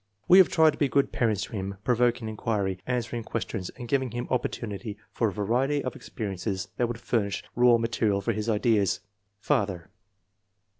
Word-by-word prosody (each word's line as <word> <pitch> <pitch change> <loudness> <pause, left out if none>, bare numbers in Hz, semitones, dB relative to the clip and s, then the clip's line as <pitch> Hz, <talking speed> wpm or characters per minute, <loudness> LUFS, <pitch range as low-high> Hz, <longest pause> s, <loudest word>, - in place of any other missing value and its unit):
We 185 - +8
have 190 - +7
tried 160 -1 +5
to 150 - -11
be 145 - +3
good 140 +3 +2
parents 110 -4 +1
to - - -8
him, 100 -2 -4
provoking 120 -1 +2
inquiry, 105 -3 -2
answering 120 -1 -2
questions 100 -4 -4
and 120 -2 -7
giving 130 +1 +1
him 120 +1 -4
oppor 125 -2 +1
tunity 105 -1 -6
for 115 - +1
a - - -1
variety 125 +9 0
of 130 - -4
experiences 95 -2 -4
that 120 - +2
would 115 -1 -5
furnish 100 -5 -1
raw 120 -1 +6
material 115 -3 +1
for 115 +3 -1
his 105 +2 -2
ideas." 105 -4 +2 0.4
(Father.) 95 -5 -1
115 Hz, 180 wpm, -27 LUFS, 100-125 Hz, 0.4 s, We